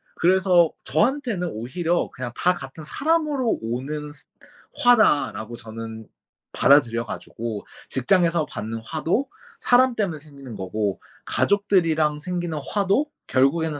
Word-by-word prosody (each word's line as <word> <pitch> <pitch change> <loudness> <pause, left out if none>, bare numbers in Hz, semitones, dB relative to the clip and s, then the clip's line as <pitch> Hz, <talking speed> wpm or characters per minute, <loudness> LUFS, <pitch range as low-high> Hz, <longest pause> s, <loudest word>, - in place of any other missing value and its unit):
그래서 180 -2 +4
저한테는 215 - 0
오히려 165 +10 -1
그냥 125 -1 -5
다 180 - +3
같은 135 -1 -9
'사람으로 295 - 0
오는 140 +6 -4
스 - - -12 0.6
화다.'라고 145 - +3
저는 110 -1 -8 0.5
받아들여 120 -5 +4
가지고 110 -1 -6 0.2
직장에서 170 +4 +2
받는 110 +1 -5
화도 165 - -1 0.3
사람 255 - +4
때문에 190 -9 -1
생기는 140 -4 -12
거고 100 0 -2 0.3
가족들이랑 165 -7 +2
생기는 175 -1 -3
화도 200 +7 +1 0.2
결국에는 145 +3 +1
155 Hz, 290 characters per minute, -23 LUFS, 120-190 Hz, 0.6 s, 그래서